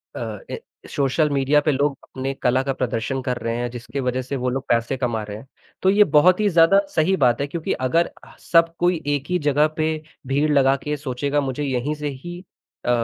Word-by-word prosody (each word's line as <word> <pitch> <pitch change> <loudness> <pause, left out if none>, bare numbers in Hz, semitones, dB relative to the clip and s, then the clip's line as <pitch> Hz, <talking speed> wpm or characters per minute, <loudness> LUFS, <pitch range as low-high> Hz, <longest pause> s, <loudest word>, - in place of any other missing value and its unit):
अ, - - -5
ए - - -4 0.3
social 145 +2 +1
media 140 +1 +3
पे 150 - +1
लोग 140 0 0
अपने 135 +1 -5
कला 125 +1 +3
का 135 0 -1
प्रदर्शन 130 +1 -2
कर 125 -2 -2
रहे 115 0 -3
हैं 120 0 -2
जिसके 120 +2 -6
वजह 125 0 -1
से 130 +2 -5
वो 125 -1 -1
लोग 135 +1 -3
पैसे 115 +3 +1
कमा 120 -4 -1
रहे 105 0 -7
हैं। 125 - -13 0.3
तो 190 - +3
ये 205 +2 +6
बहुत 180 +6 +6
ही 210 - +2
ज़्यादा 170 +3 +5 0.2
सही 170 +4 +3
बात 125 -2 +2
है 140 - -1
क्योंकि 160 +2 -3
अगर 165 +7 +3
अ - - -15 0.2
आह, - - -17
सब 165 -1 +3
कोई 175 -2 +1
एक 145 -2 0
ही 180 - +2
जगह 150 0 +3
पे 155 0 +1 0.4
भीड़ 145 +3 +1
लगा 135 -2 +4
के 150 0 -2
सोचेगा 140 +1 -1
मुझे 135 +1 -3
यहीं 135 +1 -1
से 150 0 -4
ही 175 +6 -8 0.5
अ, - - -1
140 Hz, 225 wpm, -22 LUFS, 125-155 Hz, 0.5 s, ये